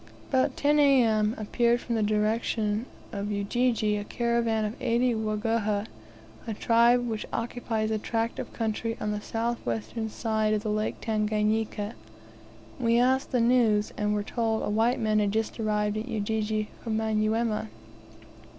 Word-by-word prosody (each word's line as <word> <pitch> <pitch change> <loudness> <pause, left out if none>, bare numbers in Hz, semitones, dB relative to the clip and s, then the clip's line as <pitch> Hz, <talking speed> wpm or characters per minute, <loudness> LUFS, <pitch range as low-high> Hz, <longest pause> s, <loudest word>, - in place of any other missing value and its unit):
About 260 -1 +1
10 295 +1 +3
A.M. 230 -6 +4
appeared 235 +2 +1
from 240 - -4
the 225 - +1
direction 215 +1 0 0.2
of 205 -1 -3
Ujiji 210 +1 +1
a 205 - -3
caravan 235 -1 0
of 210 - -3
eighty 240 +1 +2
Waguhha, 215 -1 0 0.6
a 225 - -2
tribe 235 +2 +4
which 220 -2 -3
occupies 230 -2 -2
a 215 - 0
tract 230 +2 -2
of - - -5
country 225 0 -2
on 210 - -2
the 210 0 -3
south 230 +2 -2
western 120 - -3
side 215 -1 0
of 210 - -2
the 215 - -1
Lake 215 0 -1
Tanganika. 215 0 0 0.9
We 235 -1 +3
asked 260 +2 +2
the 250 -3 +2
news, 230 -3 +3
and 210 0 0
were 205 - -1
told 225 0 -1
a - - -1
white 225 +4 +2
man 215 -2 +2
had 205 -1 +1
just 220 +2 -2
arrived 210 -1 0
at 220 +3 -4
Ujiji 215 -1 -1
from 225 -2 -1
Manyuema. 220 0 0
220 Hz, 155 wpm, -27 LUFS, 210-235 Hz, 0.9 s, A.M